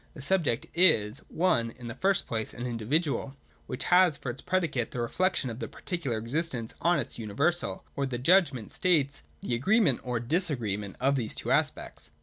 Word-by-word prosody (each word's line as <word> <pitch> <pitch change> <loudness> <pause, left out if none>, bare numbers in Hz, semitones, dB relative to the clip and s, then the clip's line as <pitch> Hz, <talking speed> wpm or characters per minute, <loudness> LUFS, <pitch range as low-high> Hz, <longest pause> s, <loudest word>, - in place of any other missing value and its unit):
The 145 - -8
subject 150 -8 +1
is, 135 - +4 0.2
(i) 180 -7 +4
in 115 +1 -8
the 115 - -5
first 195 0 +2
place, 110 -2 -3
an 120 - -5
individual, 135 +5 -1 0.3
which 125 - -3
has 180 -4 +4
for 130 - -4
its 130 - -8
predicate 155 -11 0
the 125 - -6
reflection 130 +2 0
of 115 - -8
the - - -4
particular 160 - -3
existence 120 0 -2
on 175 0 +3
its 140 - -4
universal; 140 +11 -1
or 140 -1 -1
the 125 -2 -3
judgment 140 - +3
states 150 - +1 0.2
the - - -2
agreement 165 - +3
or 125 -2 -2
disagreement 120 - -1
of 135 +2 +2
these 115 -4 -2
two - - -3
aspects. - - -1
135 Hz, 175 wpm, -28 LUFS, 120-170 Hz, 0.3 s, is